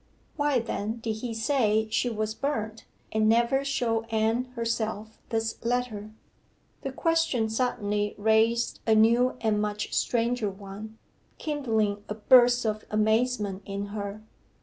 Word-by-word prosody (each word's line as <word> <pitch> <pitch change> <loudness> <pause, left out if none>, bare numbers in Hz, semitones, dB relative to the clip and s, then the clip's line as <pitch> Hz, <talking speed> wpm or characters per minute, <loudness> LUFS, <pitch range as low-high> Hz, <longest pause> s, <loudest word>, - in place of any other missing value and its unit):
Why, 290 -2 +2
then, 225 -1 -2
did 225 -1 -3
he 235 +1 -4
say 220 -3 +1
she 245 - +1
was 215 -1 -2
burnt, 220 -4 -3 0.3
and 215 0 +2
never 235 +4 +3
show 240 -5 0
Anne 225 +2 0
herself 220 -2 -3
this 225 -1 -2
letter? 235 -3 -2 0.7
The 270 - -4
question 325 -6 +1
suddenly 210 -4 -1
raised 220 +2 +2
a 220 - +5
new 235 +4 +4
and 215 -2 +1
much 210 0 -3
stranger 235 -2 +1
one 200 +3 -9 0.4
kindling 220 -9 -1
a 210 - -3
burst 245 +1 +5
of 215 0 -1
amazement 215 -2 +1
in 200 +1 -4
her. 205 0 -5
220 Hz, 130 wpm, -27 LUFS, 215-245 Hz, 0.7 s, a